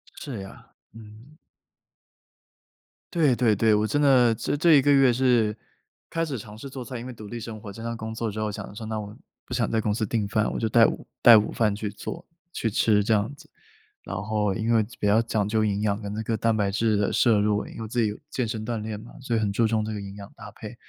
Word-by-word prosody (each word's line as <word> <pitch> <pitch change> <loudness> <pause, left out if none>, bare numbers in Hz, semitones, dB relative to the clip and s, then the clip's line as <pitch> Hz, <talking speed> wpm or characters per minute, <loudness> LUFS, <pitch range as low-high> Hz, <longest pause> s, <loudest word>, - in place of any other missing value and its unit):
是 130 -7 -6
呀， 95 - -11 0.3
嗯。 115 +6 -14 1.8
对， 155 -8 +3
对， 115 -3 +3
对， 110 +2 +3
我 105 +1 +2
真 145 +6 0
的 125 -5 +5
这 145 - -2
这 165 +2 +5
1 145 - +7
个 145 +2 +3
月 135 -3 +5
是 120 -4 +2 0.5
开 165 0 -1
始 145 -5 -4
尝 105 -1 -10
试 135 +5 -8
做 130 -1 -7
菜， 120 0 -6
因 120 - -8
为 130 - -7
独 110 -2 -10
立 120 +3 -6
生 115 -1 -7
活、 105 - -8
经 100 - -10
常 115 0 -3
工 110 0 -6
作 115 0 -2
之 105 +1 -6
后 110 -1 -1
想 - - -6
要 - - -12
说， 110 +1 -7
那 110 0 -3
我 105 0 -8 0.3
不 - - -8
想 120 -3 0
在 115 - +1
公 105 -1 0
司 110 +1 -1
订 105 -1 -1
饭， 105 +1 0
我 - - -3
就 115 - 0
带 115 +1 +6
午 - - -2
带 115 -2 +9
午 105 - +1
饭 110 -3 +1
去 105 +1 -4
做 135 - -7 0.3
去 115 - -2
吃 105 0 +3
这 110 - +2
样 110 +5 0
子。 - - -18 0.5
然 - - -6
后 105 -1 0
因 115 +1 0
为 110 -1 +4 0.2
比 105 - 0
较 105 +3 +4
讲 110 -3 -1
究 110 +1 +1
营 105 -1 0
养 105 0 0
跟 100 -1 -5
那 110 - -3
个 110 +1 -1
蛋 115 0 +1
白 105 -2 +1
质 110 +1 +1
的 105 - +1
摄 115 -4 +4
入， 105 0 +1
因 - - -9
为 110 - -5
自 120 +2 0
己 110 - +2
有 105 - -6
健 125 - -1
身 110 -1 -4
锻 115 -1 -3
炼 105 -1 -5
嘛， 115 - -13
所 120 -3 -2
以 - - +2
很 105 -2 0
注 115 +3 +2
重 110 -1 0
这 110 - -4
个 105 - -5
营 100 0 -8
养 100 -1 -10
搭 - - -11
配， - - -10
110 Hz, 280 characters per minute, -25 LUFS, 105-120 Hz, 1.8 s, 带